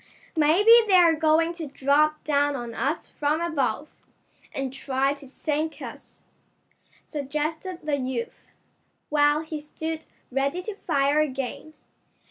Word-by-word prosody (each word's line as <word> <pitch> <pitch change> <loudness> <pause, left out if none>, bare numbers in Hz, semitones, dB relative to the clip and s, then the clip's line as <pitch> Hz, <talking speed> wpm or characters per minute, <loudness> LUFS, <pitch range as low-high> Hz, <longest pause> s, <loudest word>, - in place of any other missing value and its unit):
"Maybe 330 +8 +5 0.2
they're 355 -4 +6
going 320 +2 +3
to 335 -3 -6
drop 290 +3 +2
down 290 -1 +1
on 240 -3 -5
us 275 +8 -1
from 300 +1 -1
above, 300 -5 -1 0.6
and 270 -1 -4
try 270 +1 0
to 280 -1 -13
sink 305 +3 -3
us," - - -10 0.8
suggested 305 +5 -4
the 300 -2 0
youth, 255 -3 -4 0.6
while 295 0 +3
he 315 -1 -5
stood 315 +2 -6 0.2
ready 275 +7 -1
to 430 - -5
fire 290 -6 +1
again. 280 +1 -3
300 Hz, 120 wpm, -25 LUFS, 275-320 Hz, 0.8 s, they're